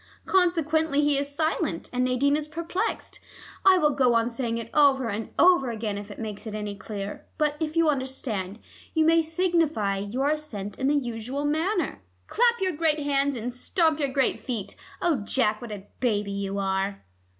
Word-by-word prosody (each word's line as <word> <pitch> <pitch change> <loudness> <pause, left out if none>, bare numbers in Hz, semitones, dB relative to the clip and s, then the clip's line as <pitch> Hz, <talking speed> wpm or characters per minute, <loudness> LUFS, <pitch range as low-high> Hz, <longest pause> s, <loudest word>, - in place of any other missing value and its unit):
Consequently 320 -5 +2
he 290 -1 +3
is 280 +1 0
silent, 310 - -1
and 250 0 +1
Nadine 255 +3 +2
is 300 0 -2
perplexed. 335 +4 -3 0.4
I 380 -1 +7
will 300 -4 +3
go 255 -3 +3
on 230 +1 +2
saying 230 -1 -2
it 230 0 -6
over 275 -4 +4
and 215 0 -4
over 350 -8 +5
again 220 -3 -3
if 205 +1 -7
it 205 - -9
makes 215 -1 -6
it 215 - -5
any 210 -1 -3
clearer, 200 -1 -7
but 300 -1 +1
if 315 0 -2
you 330 -1 +4
understand, 260 -8 -2 0.4
you 320 -1 +4
may 330 +1 +5
signify 320 - +1
your 245 +8 -1
assent 220 -11 -4
in 265 - +1
the 290 - +3
usual 250 +1 -2
manner. 320 - 0 0.2
Clap 475 0 +2
your 375 -1 +1
great 310 -1 +1
hands 280 -1 +1
and 240 +2 -4
stamp 320 +4 +1
your 280 -2 0
great 265 0 +1
feet: 230 -7 -4 0.3
oh, 340 -5 +3
Jack, 215 0 0
what 240 -2 -7
a 200 -2 -7
baby 210 -5 0
you 200 0 -3
are!" 195 0 -1
265 Hz, 185 wpm, -26 LUFS, 215-310 Hz, 0.4 s, I